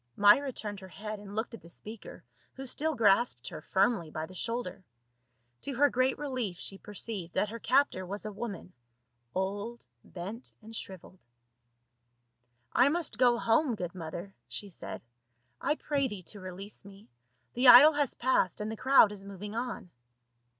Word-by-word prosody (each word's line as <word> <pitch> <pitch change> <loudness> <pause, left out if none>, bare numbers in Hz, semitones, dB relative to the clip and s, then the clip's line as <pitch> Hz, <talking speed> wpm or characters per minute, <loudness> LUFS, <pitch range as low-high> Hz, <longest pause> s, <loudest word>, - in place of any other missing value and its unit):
Myra 210 +7 +6
turned 205 -4 -5
her 190 - -10
head 210 +3 -6
and 205 0 -10
looked 220 +2 -2
at 230 - -9
the 170 - -14
speaker 215 +5 -9 0.3
who 270 - -7
still 310 +4 -1
grasped 210 - +3
her - - -8
firmly 195 -1 +1
by 155 +1 -4
the 185 - -13
shoulder; 230 0 -4 0.8
to 275 - -4
her 285 +3 +4
great 255 +1 +2
relief 255 -10 -3
she 195 +1 -5
perceived 205 -4 -6
that 210 - +1
her 230 +2 -6
captor 255 -6 +2
was 200 +3 -5
a 215 - -3
woman, 200 -4 -6 0.6
old, 200 +5 -3 0.2
bent, 200 +8 -7
and 225 +1 -10
shriveled. 185 -2 -8 0.8
" 120 0 -42
I 275 - +5
must 335 +2 -1
go 245 -2 +5
home, 235 +3 +2
good 175 -4 -5
mother," 175 +2 -7
she 205 - -6
said. 180 - -8 0.3
" 120 +1 -44
I 295 - +1
pray 285 -3 0
thee 205 -6 -7
to 205 - -11
release 185 +2 -8
me; 200 +1 -14 0.5
the 250 +2 +3
idol 290 +6 +11
has 290 -3 0
pa.sscd 235 -8 +1
and 210 +1 -3
the 220 - -5
crowd 260 -5 +6
is 200 -2 -7
moving 200 +1 -7
on." 235 -6 -4
210 Hz, 170 wpm, -30 LUFS, 185-245 Hz, 0.8 s, idol